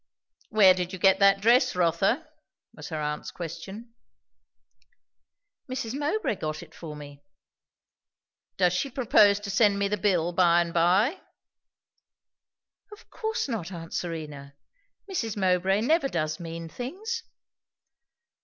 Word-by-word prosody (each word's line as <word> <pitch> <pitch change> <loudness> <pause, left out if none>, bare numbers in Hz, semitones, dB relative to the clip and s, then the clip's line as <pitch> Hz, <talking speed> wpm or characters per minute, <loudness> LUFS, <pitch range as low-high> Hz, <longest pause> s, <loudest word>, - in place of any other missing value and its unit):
"Where 200 -4 +6
did 180 0 -4
you - - -4
get 190 +1 +4
that 195 0 +5
dress, 245 +2 +4
Rotha?" 180 - +1 0.5
was - - -9
her 155 -2 -4
aunt's 150 0 -3
question. 190 +7 -8 1.8
"Mrs. 250 -3 -4
Mowbray 290 - -1
got 155 +2 -4
it 160 -2 -17
for 155 -3 -9
me." 145 -1 -11 1.4
"Does 180 -2 +3
she 230 +10 -1
propose 215 -6 +4
to 205 -1 -5
send 205 -1 +3
me 200 0 +1
the 210 +1 -1
bill 180 -4 +1
by 175 -1 +4
and 170 -1 -4
by?" 190 - +2 1.7
"Of 420 - -15
course 440 -5 -3
not! 210 -9 -4
Aunt 165 -2 -8
Serena, 150 -5 -6 0.5
Mrs. 230 - -3
Mowbray 190 +1 +2
never 305 +4 +2
does 155 - -2
mean 165 -1 -7
things." 385 - -5
190 Hz, 125 wpm, -26 LUFS, 170-230 Hz, 1.8 s, Where